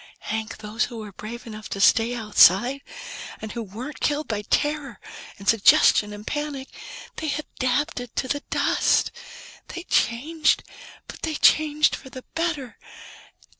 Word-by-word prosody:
Hank, 220 0 -3
those 215 +2 -2
who 235 - -9
were 215 -2 -7
brave 230 +5 -8
enough 215 -2 -9
to 195 - -4
stay 225 +4 +4
outside, 225 +3 +4 0.6
and 220 -1 -6
who 235 - -4
weren't 230 +8 -8
killed 295 0 0
by 210 -2 -2
terror 290 +1 -1 0.4
and 200 - -12
suggestion 210 -1 +5
and 210 0 -9
panic 295 -2 -4 0.5
they 310 -2 -2
adapted 255 -3 -2
to 260 - -1
the 285 +2 -1
dust. - - +2 0.6
They 345 - -7
changed, 305 +5 +1 0.4
but - - -10
they 315 -1 -2
changed 305 0 +4
for 265 - -12
the 255 0 -10
better. 305 -8 -3
245 Hz, 140 wpm, -24 LUFS, 215-295 Hz, 0.6 s, suggestion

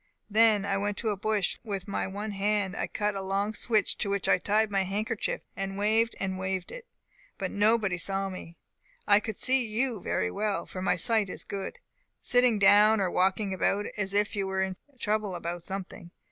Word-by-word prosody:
Then 215 -2 +4
I 195 -1 0
went 205 0 -2
to 225 - -1
a - - -1
bush, 210 -1 0
and 225 - -13
with 195 -1 -3
my 200 - -2
one 205 +2 -5
hand 200 -1 0 0.2
cut 210 -1 -1
a 195 - -4
long 195 +2 -1
switch, 220 -1 +1
to 200 - -1
which 200 -1 -1
I - - +4
tied 210 +3 +1
my 195 -1 +2
handkerchief, 210 +3 -2
and 195 -1 -4
waved 220 +3 +2
and 190 -1 -2
waved 190 -1 -3
it; - - -9 0.5
but - - -3
nobody 205 -3 +2
saw 195 +2 +1
me. 175 -3 -9 0.5
I 205 0 +6
could 215 -1 -5
see 260 0 +3
you 230 -1 -2
very 90 - -1
well 210 - -2
(for 185 - -7
my 190 - +2
sight 220 -4 +2
is - - -4
good) 200 - -6 0.4
sitting 245 -3 +3
down, 205 +2 +6
or 190 -2 0
walking 190 +2 +1
about, 200 +3 0
as 200 -1 0
if 205 +1 +1
you 195 -1 -1
were 190 0 0
in 190 -1 -3 0.2
trouble 210 -3 -1
about 175 0 -4
something. 185 -1 -7
200 Hz, 200 wpm, -28 LUFS, 190-215 Hz, 0.5 s, I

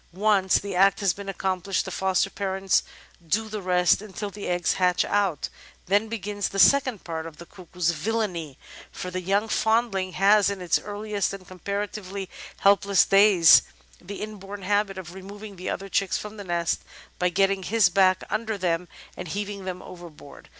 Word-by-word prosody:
Once 195 -1 +3
the 200 -2 -5
act 195 +2 +4
has 195 -4 +2
been 200 0 -8
accomplished 190 0 -1
the - - -6
foster 190 0 0
parents 195 -1 0 0.5
do 220 +7 0
the 215 -1 -5
rest 180 0 +3
until 205 0 -6
the 205 0 -7
eggs 175 -1 +1
hatch 180 -1 +3
out; 195 -7 0 0.4
then 205 +4 +2
begins 205 -2 -3
the 195 - -6
second 260 -1 +4
part 160 -1 -5
of 160 -2 -12
the 170 - -11
Cuckoo's 180 -2 -3
villainy, 170 -5 -3 0.3
for 180 -1 -6
the 185 0 -3
young 200 +4 +1
foundling 220 -5 0
has 200 +2 +4
in 200 -1 -4
his 180 -2 +1
earliest 205 -1 -3
and 190 -2 -9
com 185 0 -13
paratively 200 0 -4 0.3
helpless 200 -1 +4
days 195 -5 +7 0.4
the 200 +3 -7
inborn 205 -2 -8
habit 205 0 0
of 175 -2 -8
removing 200 +2 -10
the 185 0 -5
other 195 - -4
chicks 195 0 0
from 210 +1 -8
the 205 - -7
nest 170 -2 -1 0.4
by 180 - +2
getting 195 +2 +1
his 210 0 +3
back 185 +1 +3
under 215 0 -2
them 180 -2 -1 0.3
and 180 - -7
heaving 200 +2 -5
them 180 -1 -5
overboard. 170 -5 -12
195 Hz, 175 wpm, -25 LUFS, 180-205 Hz, 0.5 s, days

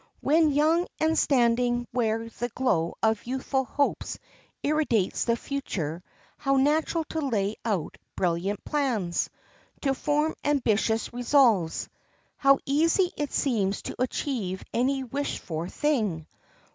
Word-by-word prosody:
When 310 +1 +3
young 315 +5 +3
and 320 +1 +2
standing 240 -3 +2
where 225 -2 0
the 240 +2 -4
glow 190 -10 0
of 220 -1 +2
youthful 265 +1 -1
hopes 285 +4 -1 0.5
irradiates 285 -10 +1
the 235 - +2
future 185 - -4 0.4
how 275 -1 +1
natural 305 +4 +2
to 320 - -2
lay 215 -7 0
out 200 -9 -2 0.2
brilliant 185 +3 -1
plans! 235 - 0 0.5
to 270 -2 +1
form 300 +3 0
ambitious 225 -6 +1
resolves! 240 - +3 0.5
How 275 -1 +5
easy 330 +6 +2
it 290 -1 -3
seems 205 -7 0
to - - -6
achieve 235 -7 -2
any 265 +3 +1
wished 280 +3 -3
for 165 +1 -5
thing! 215 - 0
250 Hz, 120 wpm, -27 LUFS, 210-285 Hz, 0.5 s, How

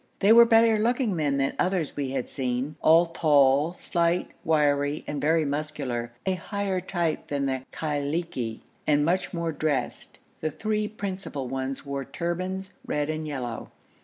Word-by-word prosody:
They 205 +3 +5
were 235 0 +9
better 225 -1 +5
looking 235 -2 +1
men 145 -4 +1
than 135 0 +1
others 180 -4 0
we 140 -2 -2
had 130 -2 -2
seen, 130 +2 -2
all 165 +2 +6
tall, 150 -2 +3
slight, 170 0 0
wiry, 145 -2 +2
and 145 -1 -4
very 160 +2 +3
muscular, 140 -5 -3
a 190 - +2
higher 190 +1 -2
type 170 -3 -2
than 140 -1 -1
the 130 -1 -2
Khailiki 145 -5 -2 0.3
and 145 -1 +3
much 180 +3 0
more 170 -2 -2
dressed. 150 -5 -2 0.2
The 155 - -1
three 215 +6 -1
principal 195 -10 -5
ones 135 +2 -4
wore 140 -1 -3
turbans, 185 +5 -4
red 150 +1 -1
and 155 0 -4
yellow. 125 -6 -5
155 Hz, 155 wpm, -26 LUFS, 140-180 Hz, 0.3 s, were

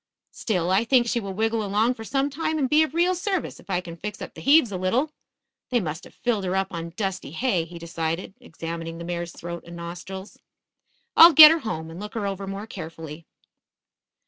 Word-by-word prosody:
Still, 180 -5 -1
I 195 +4 +3
think 245 0 +3
she 235 0 0
will 195 -3 -6
wiggle 225 +1 0
along 210 +4 +1
for 225 - -9
some 275 +5 -1
time 315 +2 -2
and 275 -3 +1
be 300 +3 +4
of 315 -1 0
real 350 +2 +3
service 375 0 -3
if - - -19
I 180 -2 0
can 170 -2 -9
fix 210 +5 -7
up - - -8
the - - -11
heaves 280 -5 +5
a 190 - -3
little. 235 +12 0 0.6
They 250 -1 +2
must 160 -4 -5
have - - -16
filled 230 -5 -1
her 185 0 -1
up 195 0 0
on 170 -1 -6
dusty 195 -5 -3
hay," 185 -4 0
he 170 +1 -11
decided, 165 +2 -4
examining 165 0 -6
the 170 - -7
mare's 175 0 -4
throat 170 +1 -7
and 170 0 -11
nostrils. 180 +3 -8 0.8
"I'll 335 +1 +10
get 310 +1 +11
her 330 - +2
home 160 - -5
and 165 - -9
look 210 +2 -8
her 215 -3 -2
over 195 0 -4
more 195 +2 -5
carefully." 160 -5 -9
195 Hz, 215 wpm, -24 LUFS, 170-245 Hz, 0.8 s, get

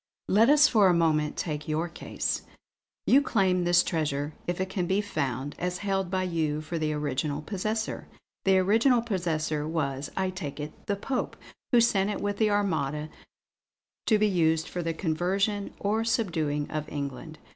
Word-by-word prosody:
Let 220 +6 +5
us 300 +1 +7
for 215 -8 +5
a 180 - +4
moment 155 -3 +1
take 150 -3 -3
your 155 +2 0
case. 170 - -3 0.6
You 275 - +6
claim 190 -9 +1
this 175 0 +5
treasure 150 -2 -1
if 175 0 -2
it 190 - 0
can 185 -2 -2
be 190 +3 +2
found 140 - -2
as 180 0 -2
held 195 -2 -1
by 185 0 0
you 160 -4 -1
for 155 +2 -4
the 155 -1 0
original 145 0 -2
possessor. 215 +4 -3 0.4
The 190 -1 +4
original 230 +6 +4
possessor 160 -7 -1
was, 140 -4 -2
I 190 -1 0
take 160 -7 -6
it, 150 +1 -5
the 200 - +1
Pope, 250 +6 -3 0.4
who 245 - +6
sent 205 -4 +3
it 210 - -2
with 205 0 -2
the 215 -1 +3
Armada, 155 -7 0 1.0
to 215 - +5
be 215 0 +3
used 160 -4 +2
for 180 - -4
the 165 -1 -2
conversion 195 +5 0
or 215 +3 0
subduing 165 -11 0
of 155 0 -3
England. 145 +2 -5
175 Hz, 170 wpm, -28 LUFS, 155-200 Hz, 1.0 s, us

